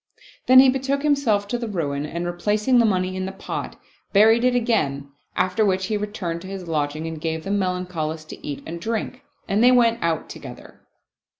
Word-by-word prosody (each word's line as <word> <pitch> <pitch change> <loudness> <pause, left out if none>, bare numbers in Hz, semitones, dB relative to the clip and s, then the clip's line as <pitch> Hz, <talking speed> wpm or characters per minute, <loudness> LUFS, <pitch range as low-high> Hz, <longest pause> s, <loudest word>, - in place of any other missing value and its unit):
Then 255 - +7
he 265 +1 +9
betook 270 +2 0
himself 260 -9 +2
to 240 - -1
the 235 - -4
ruin 150 -7 -2
and 170 +3 -4
replacing 210 +8 +1
the 230 - +4
money 185 -2 0
in 185 0 -3
the - - -4
pot, 195 - -6 0.3
buried 220 +3 +5
it 250 0 +3
again; 140 - 0 0.2
after 185 +4 +1
which 190 -2 +1
he 215 - -1
returned 205 -5 -4
to 185 - -9
his 190 -2 -7
lodging 155 0 -2
and 160 -1 -6
gave 160 0 -3
the 195 - -4
Melancholist 180 -5 -2
to - - -10
eat 145 -2 -5
and 170 +1 -7
drink, 230 +5 -3 0.3
and 205 +4 +2
they 250 - +7
went 235 -2 +3
out 165 -2 -1
together. - - -11
190 Hz, 195 wpm, -23 LUFS, 165-230 Hz, 0.3 s, he